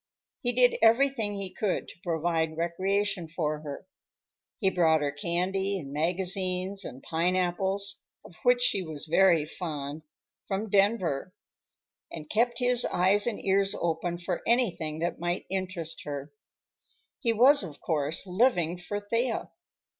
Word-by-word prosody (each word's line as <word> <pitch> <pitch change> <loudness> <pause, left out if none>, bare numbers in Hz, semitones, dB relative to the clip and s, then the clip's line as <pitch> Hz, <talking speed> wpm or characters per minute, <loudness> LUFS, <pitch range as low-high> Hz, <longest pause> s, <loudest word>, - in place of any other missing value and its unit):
He 245 - +2
did 245 0 +3
everything 230 -2 +3
he 195 -2 -5
could 205 -4 -1
to - - -14
provide 160 -1 -1
recreation 190 +2 0
for 155 -2 -2
her. 150 +3 -8 0.7
He 190 -4 +2
brought 160 -4 +3
her 145 - 0
candy 185 +6 0
and 140 -6 -8
magazines 185 +4 -1
and 130 -4 -9
pineapples—of 185 +3 -1
which 245 0 +3
she 200 -5 +3
was 160 -4 -7
very 170 -1 +4
fond—from 155 +6 -6
Denver, 195 -5 +1 0.8
and 155 -2 -7
kept 235 +2 +2
his 245 -1 +3
eyes 195 +5 +2
and 230 - -2
ears 195 0 +2
open 170 +1 -1
for 175 0 -3
anything 180 -11 +1
that 175 - -2
might 175 +2 -2
interest 185 -4 -3
her. 145 0 -6 0.9
He 235 -4 +1
was, 260 +6 +6
of 160 -7 -8
course, 155 +1 0
living 180 -4 +1
for 205 +4 -4
Thea. 230 +3 -2
185 Hz, 130 wpm, -28 LUFS, 165-205 Hz, 0.9 s, was